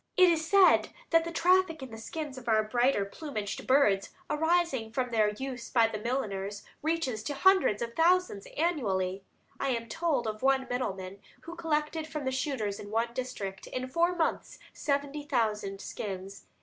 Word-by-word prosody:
It 365 -1 +8
is 320 -1 +1
said 395 -2 +6 0.2
that 330 0 +4
the 335 - -4
traffic 350 -3 +3
in 260 - -8
the 225 - -8
skins 295 +4 -5
of 245 - -16
our 220 -1 +4
brighter 240 -1 +2
plumaged 215 -3 -5
birds, 215 -8 +4 0.2
arising 320 -7 +1
from 250 +1 -1
their 215 -2 +3
use 250 +3 -6
by 230 -3 +4
the 215 - -4
milliners, 205 -4 -3 0.2
reaches 310 -8 -1
to 285 +6 -4
hundreds 375 - +4
of 235 0 -5
thousands 340 - +2
annually. 200 - 0 0.4
I 275 - 0
am 230 0 -5
told 305 0 0
of 215 -1 -4
one 265 0 +3
middleman 195 -6 -3 0.2
who 335 +1 -9
collected 310 -1 -1
from 305 -3 -5
the 260 - 0
shooters 255 -7 -2
in 205 - -8
one 230 +2 0
district, 205 -7 -5
in 255 0 -4
four 340 +5 +2
months, 330 -2 -1 0.2
seventy 285 0 -1
thousand 210 -7 -1
skins. 195 -1 -6
255 Hz, 170 wpm, -30 LUFS, 215-315 Hz, 0.4 s, It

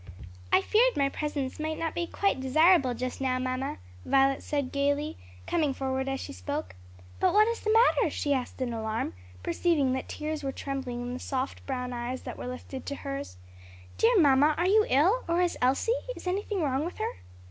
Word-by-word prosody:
"I - - +6
feared - - +3
my 275 -1 +3
presence 290 -2 -3
might 315 0 -2
not 325 -1 -2
be 345 0 -2
quite 395 -6 0
desirable 275 0 +4
just 255 +2 -4
now, 255 -1 +1
mamma," 255 - -2 0.3
Violet 270 0 +3
said 285 -3 -2
gayly, 285 +2 0 0.3
coming 295 -5 0
forward 265 0 -2
as 270 0 -2
she - - -7
spoke. 90 +1 -4 0.5
"But - - +3
what 425 +1 +6
is 465 0 -1
the 430 - 0
matter?" 455 +2 +4
she 285 - 0
asked 260 0 -2
in 240 -2 -3
alarm, 220 - -2 0.3
perceiving 280 - +1
that 260 - -4
tears 305 0 -4
were 275 -1 -2
trembling 265 -3 -4
in 245 0 -4
the 250 - -5
soft 265 0 -3
brown 250 -2 -3
eyes 245 +2 -4
that - - -6
were - - -5
lifted 255 +1 -7
to 280 - -3
hers. 275 - -6 0.6
"Dear 460 0 +5
mamma, 290 0 +5
are 350 +2 +2
you 425 +2 +4
ill? 350 - +3
or 340 +1 +1
is 355 -1 +1
Elsie? 260 - +2 0.2
is - - -11
anything 390 0 -1
wrong 275 0 0
with 345 - -5
her?" - - -3
275 Hz, 195 wpm, -28 LUFS, 255-330 Hz, 0.6 s, I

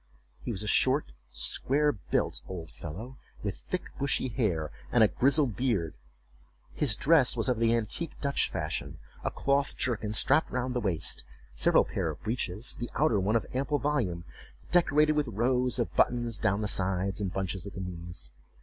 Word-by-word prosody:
He - - -6
was 110 -3 -2
a - - -5
short 60 - +3 0.2
square 150 +3 +1
built 95 -10 -2
old 85 -4 -7
fellow, 110 +12 -8 0.2
with 100 -2 -3
thick 185 - -4
bushy 140 -1 0
hair, 95 - -1 0.2
and 120 - +5
a - - +7
grizzled 135 0 +2
beard. 100 - 0 0.8
His 130 -8 +2
dress 140 -3 +4
was 115 - +1
of 125 -3 +1
the 115 0 +3
antique 115 +8 -3
Dutch 140 -1 +1
fashion—a - - -5
cloth 140 +1 0
jerkin 110 -4 -1
strapped 155 +8 +4
round 125 0 -2
the 125 - -1
waist—several 80 - +1
pair - - -2
of - - -7
breeches, 110 0 -1
the 120 - -4
outer 140 -9 +3
one 100 +4 +1
of 115 - +1
ample 140 +3 0
volume, 120 -13 -1 0.5
decorated 155 -3 +4
with 150 -2 0
rows 125 +4 +1
of 120 - -2
buttons 120 -3 +2
down 100 +2 +1
the 105 - -1
sides, 95 0 0
and 95 -3 -1
bunches 95 0 -3
at 100 - -8
the - - -5
knees. 85 -6 -5
115 Hz, 170 wpm, -29 LUFS, 95-130 Hz, 0.8 s, a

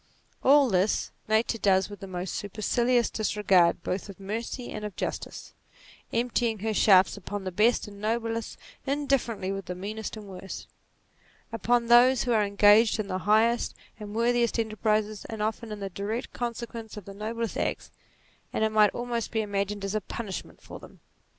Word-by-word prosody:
All 280 0 +6
this, 195 -1 +1 0.2
Nature 220 +1 +1
does 190 -2 +3
with 205 -1 -10
the 195 - -8
most 180 0 -4
supercilious 235 +4 +1
disregard 190 -5 +2
both 190 +2 -3
of 200 - -10
mercy 230 +5 -5
and 215 - -6
of 210 -3 -5
justice, - - -5 0.6
emptying 235 -1 0
her 215 +2 -2
shafts 195 -2 +5
upon 205 +1 -5
the 185 - -4
best 215 +6 +2
and 200 -1 -11
noblest 225 +1 -2 0.3
indifferently 270 -8 0
with 195 -1 -4
the 180 - -5
meanest 215 +4 -5
and 215 - -9
worst; 190 0 -8 0.9
upon 235 +2 +1
those 240 +2 +6
who 245 - -1
are 220 -2 +4
engaged 205 +2 +5
in 205 -2 -3
the 185 - -1
highest 230 +3 +3 0.2
and 210 0 -7
worthiest 235 0 +2
enterprises, 215 -1 0
and 220 -2 -4
often 220 +1 -3
as 210 - -4
the 195 -1 -5
direct 205 +6 -4
con 240 -1 -3
sequence 230 -2 -8
of 205 - -8
the 200 - -9
noblest 225 +2 -4
acts; - - -2 0.6
and - - -1
it 220 - +2
might 215 -1 +5
almost 240 -1 -2
be 220 - 0
imagined 200 -1 -2
as 195 - -3
a 215 - 0
punishment 200 0 -7
for - - -9
them. - - -15
215 Hz, 175 wpm, -27 LUFS, 200-230 Hz, 0.9 s, All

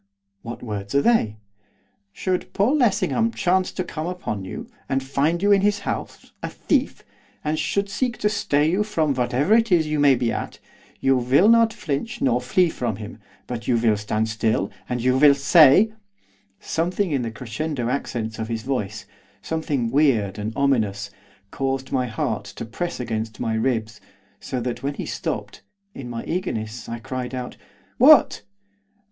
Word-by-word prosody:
'What 115 +1 -8
words 105 -1 -5
are 140 - +5
they?' 110 - +2 0.7
'Should 185 - -2
Paul 215 +9 +2
Lessingham 225 - +2
chance 185 +1 +1
to 185 - -2
come 160 -2 -5
upon 175 - -4
you, 95 - -6 0.2
and 135 -1 0
find 145 +6 0
you 205 - +4
in 200 -1 +5
his 205 0 +1
house, - - -5
a - - -3
thief, - - -1 0.4
and 155 +1 -1
should 200 0 0
seek 240 +4 -2
to 210 - +1
stay 150 -8 +1
you 185 +6 +1
from 165 -9 0
whatever 125 - +1
it 230 -1 +3
is 170 -3 +4
you 155 -1 -1
may 140 -2 +6
be 120 -1 0
at, - - -4 0.4
you 135 0 +4
will 130 - +4
not 230 0 +5
flinch 215 - -4
nor 125 -2 +2
flee 175 +9 +2
from 120 -9 -3
him, 110 +3 -9 0.3
but 120 0 -6
you 120 - +3
will 115 -2 +3
stand 105 +1 -1
still, 110 -2 0 0.2
and 125 -1 -2
you 130 0 +3
will 145 -1 +7
say 155 +9 +6 0.3
' 100 0 -36 0.2
Something 175 +3 -1
in 140 -3 +1
the 115 - -2
crescendo 120 +3 -4
accents 115 -4 -3
of 110 - -3
his 115 -1 -4
voice, 105 -6 -3 0.4
something 145 -6 -2
weird 115 -9 +2
and 105 +1 -3
ominous, 105 -8 0 0.4
caused 135 -1 -2
my 130 -2 0
heart 115 -3 -2
to - - -7
press 170 +10 -4
against 110 -2 -4
my 115 - -1
ribs, 110 -2 -1 0.4
so 130 - -4
that 120 0 -3
when 140 +1 -2
he - - -5
stopped, - - -4 0.3
in 125 -3 -8
my 115 -1 -5
eagerness 120 - -4
I 115 - -4
cried 130 +1 -5
out, 125 -1 -5 0.4
'What? 285 +1 +7
135 Hz, 175 wpm, -23 LUFS, 115-175 Hz, 0.7 s, will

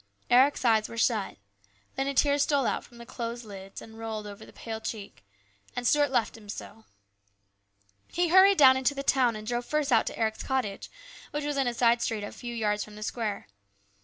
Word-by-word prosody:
Eric's 260 +2 +4
eyes 220 -2 +3
were 230 - -8
shut 220 -3 0 0.6
Then 270 +1 -1
a 280 - -2
tear 285 +1 +3
stole 285 -2 +2
out - - -1
from 240 - -17
the 235 - -10
closed 235 0 -6
lids 195 -2 -10
and 225 0 -13
rolled 220 -2 -5
over 205 -1 -10
the - - -14
pale 225 -1 -7
cheek, 210 - -7 0.5
and 245 - -3
Stuart 290 +2 +3
left 240 -5 0
him 210 -2 -14
so. 220 +1 -9 1.2
He 350 0 0
hurried 380 +2 +7
down 260 -2 +7
into 265 +2 +1
the 275 - -4
town 255 -4 +2
and 215 0 -7
drove 240 +2 -2
first 300 -1 -1
out 225 -2 +4
to - - -5
Eric's 220 -1 -1
cottage, 255 -7 -3 0.4
which 295 0 -4
was 295 0 -2
in 270 -2 +1
a 245 - 0
side 235 0 +3
street 220 -3 -2
a 205 - -6
few 240 -1 -7
yards 210 -2 0
from 210 - -12
the 215 - -7
square. 215 - -3
235 Hz, 210 wpm, -28 LUFS, 220-270 Hz, 1.2 s, hurried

